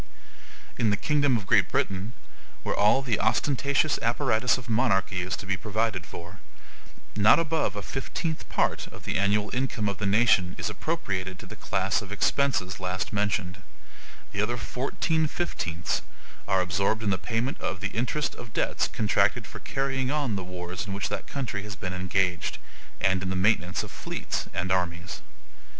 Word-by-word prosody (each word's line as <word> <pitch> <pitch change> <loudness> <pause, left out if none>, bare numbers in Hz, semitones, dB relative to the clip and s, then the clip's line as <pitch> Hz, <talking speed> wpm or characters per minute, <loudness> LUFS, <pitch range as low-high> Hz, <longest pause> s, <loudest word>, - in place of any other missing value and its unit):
In 115 - +3
the 105 - +2
kingdom 145 -2 +3
of 100 - -5
Great - - +4
Britain, 100 +4 -1 0.5
where - - 0
all 105 +6 +4
the 120 -5 0
ostentatious 140 +6 +2
apparatus 120 0 +2
of 125 -2 -9
monarchy 95 -5 +2
is 90 +2 -2
to - - -7
be 95 0 +1
provided 105 -4 -1
for, 85 +3 -9 0.8
not 105 +1 +7
above 160 -6 +1
a 100 - -4
fifteenth 155 +4 -3
part - - +1
of - - -12
the - - -1
annual 105 +2 +2
income 125 -4 0
of 100 -2 -2
the 100 - 0
nation 100 -4 +4
is 110 - -2
appropriated 95 - -2
to - - -10
the - - -9
class 95 +2 0
of 100 -1 -9
expenses 105 -4 +1
last 90 +2 -2
mentioned; 100 -3 0 0.7
the 100 - -1
other 120 +3 0
fourteen 135 - 0
fifteenths 85 - -2 0.5
are 95 -2 +3
absorbed 100 +5 +1
in 100 - +2
the 95 - +1
payment 120 +3 -2
of 95 - -2
the 100 0 -2
interest 130 +6 -1
of 120 -2 -10
debts - - +1
contracted 105 -2 +2
for - - -9
carrying 135 -1 -1
on 140 -6 0
the 95 - -3
wars 90 +2 -5
in 100 - -3
which 100 - -2
that 100 -3 -4
country 125 -8 -3
has 105 -1 -6
been 90 0 -4
engaged, 90 -1 0 0.4
and 95 -1 +2
in 95 - -2
the 95 - -1
maintenance 90 -2 +2
of - - -8
fleets - - -3
and 90 +2 -2
armies. 90 -2 -1
105 Hz, 170 wpm, -27 LUFS, 95-125 Hz, 0.8 s, not